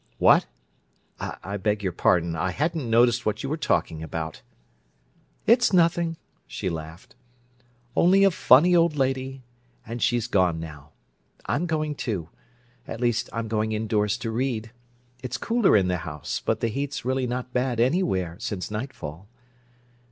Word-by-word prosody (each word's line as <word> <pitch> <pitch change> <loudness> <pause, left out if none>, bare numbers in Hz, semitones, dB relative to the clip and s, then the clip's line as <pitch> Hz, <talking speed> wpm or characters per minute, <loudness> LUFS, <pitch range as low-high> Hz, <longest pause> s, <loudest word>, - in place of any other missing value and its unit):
"What? - - +5 0.7
I 100 +3 -5
beg 105 +1 -1
your 95 - 0
pardon. 85 0 +2
I 80 +3 -1
hadn't 150 - -1
noticed 120 +1 +4
what 105 - -2
you 135 - -3
were 155 - 0
talking 80 - 0
about." 80 0 -5 1.0
"It's 240 +1 +5
nothing," 170 -1 +3 0.3
she 95 - -3
laughed. 80 +1 -8 0.8
"Only 190 +3 +5
a 195 - +6
funny 165 +2 +5
old 170 -2 +3
lady—and 125 -3 -4
she's 120 -2 +2
gone 90 -8 +2
now. 75 -3 -9 0.6
I'm 170 +5 -1
going, 155 -2 -1
too—at 120 - -7
least, 120 -2 0
I'm 115 0 -3
going 110 0 -1
indoors 105 -1 0
to 115 - -4
read. 115 -2 -2 0.5
It's 125 -2 -4
cooler 230 - +3
in 95 -2 +2
the 90 -1 0
house, 80 -5 -5
but - - 0
the 115 - +1
heat's 140 +2 -4
really 130 0 0
not 125 +1 -4
bad 125 -2 0
anywhere, 115 - +1
since 100 -1 -4
nightfall. 105 - -6
120 Hz, 145 wpm, -25 LUFS, 95-135 Hz, 1.0 s, a